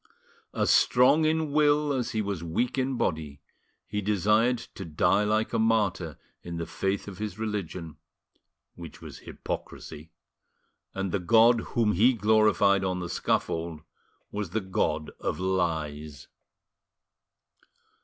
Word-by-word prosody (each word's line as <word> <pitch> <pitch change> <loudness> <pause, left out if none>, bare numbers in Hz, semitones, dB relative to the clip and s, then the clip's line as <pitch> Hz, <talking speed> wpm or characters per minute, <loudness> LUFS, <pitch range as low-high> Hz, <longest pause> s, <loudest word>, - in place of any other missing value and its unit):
As - - +1
strong 130 +6 +4
in 160 -1 0
will 150 0 +3
as 125 -4 -1
he 110 -1 -1
was 100 -4 -4
weak 115 +10 -1
in 130 -1 -1
body, 75 -7 -2 0.5
he 105 +1 -3
desired 105 +4 +2 0.2
to 95 - -7
die 85 +5 +2
like 110 +2 0
a 115 - +1
martyr 100 -8 0 0.2
in 85 -1 -6
the 85 - -3
faith 95 +4 -2
of 100 -1 -9
his 105 -2 -5
religion, 95 -7 -5 0.8
which 85 -3 -11
was - - -10
hypocrisy, 80 0 -7 0.9
and 95 -1 -2
the 100 - 0
God 115 +5 +5 0.2
whom 110 -3 +3
he 115 +8 +4
gloried 105 -3 +3
on 95 -1 -1
the 90 -1 -5
scaffold 80 -2 -2 0.5
was 105 -3 -4
the 110 +6 -1
god 80 -5 -2
of - - -3
lies. 80 -6 -2
100 Hz, 135 wpm, -27 LUFS, 85-115 Hz, 0.9 s, God